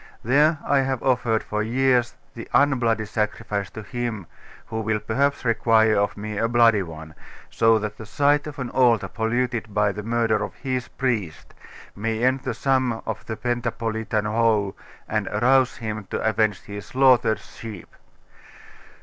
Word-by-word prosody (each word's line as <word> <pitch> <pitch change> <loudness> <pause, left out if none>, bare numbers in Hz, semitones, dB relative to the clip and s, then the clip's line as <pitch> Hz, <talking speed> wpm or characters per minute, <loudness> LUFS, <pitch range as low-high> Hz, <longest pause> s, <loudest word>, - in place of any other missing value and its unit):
There 150 +7 +3
I 140 0 +3
have 135 -2 -1
offered 120 -4 +1
for 105 0 -2
years 125 +1 +1 0.2
the 115 - -8
unbloody 120 -6 +2
sacrifice 105 -1 -2
to 110 - -9
Him, 115 -3 -4 0.4
who 110 0 -4
will 110 0 0
perhaps 130 +7 0
require 110 -1 +3
of 100 0 0
me 105 0 -4
a 115 - +2
bloody 115 -3 +4
one, 80 -3 -8
that 80 - -18 0.4
so 115 0 +4
the 105 -1 -3
sight 145 +7 +1
of 150 0 -8
an 130 -3 -4
altar 120 -3 +3
polluted 115 -1 -2
by 105 -1 +3
the 105 - -6
murder 115 0 0
of - - -6
His 130 -3 -3
priest, 110 -11 -3 0.4
may 110 +2 -2
end 130 +1 +3
the 130 - -4
sum 130 -4 0
of 110 - -4
Pentapolitan 115 -2 -2
woe, 105 -2 +1 0.3
and - - -1
arouse 130 +4 +2
Him 110 -2 -5
to - - -3
avenge 110 -3 +1
His 100 0 -8
slaughtered 125 -4 +4
sheep! 110 -6 -11
115 Hz, 155 wpm, -23 LUFS, 105-125 Hz, 0.4 s, bloody